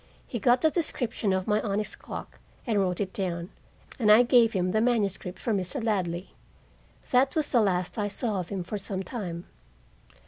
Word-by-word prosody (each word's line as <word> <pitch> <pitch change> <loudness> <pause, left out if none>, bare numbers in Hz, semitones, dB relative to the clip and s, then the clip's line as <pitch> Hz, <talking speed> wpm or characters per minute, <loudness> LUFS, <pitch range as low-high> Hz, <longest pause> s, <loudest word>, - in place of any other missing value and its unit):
He 235 - -4
got 245 +4 +4
the 315 - +4
description 245 - -1
of 190 0 0
my 210 0 +2
onyx 210 0 -2
clock - - -8 0.3
and 220 -5 +1
wrote 180 -2 0
it 195 -2 -2
down, 175 -2 -3 0.5
and 210 -3 +5
I 220 +3 +8
gave 235 -2 +5
him 180 -2 0
the 215 +2 +2
manuscript 205 -6 0
for 230 - -1
Mr. 195 +7 -2
Ladley. 185 -5 -1 0.8
That 260 +4 +3
was 310 -2 0
the 240 - +5
last 185 0 0
I 205 - 0
saw 205 0 -2
of 175 - -5
him 195 -3 -3
for 205 +4 -4
some 195 -1 -3
time. 180 -5 -5
205 Hz, 185 wpm, -27 LUFS, 185-235 Hz, 0.8 s, I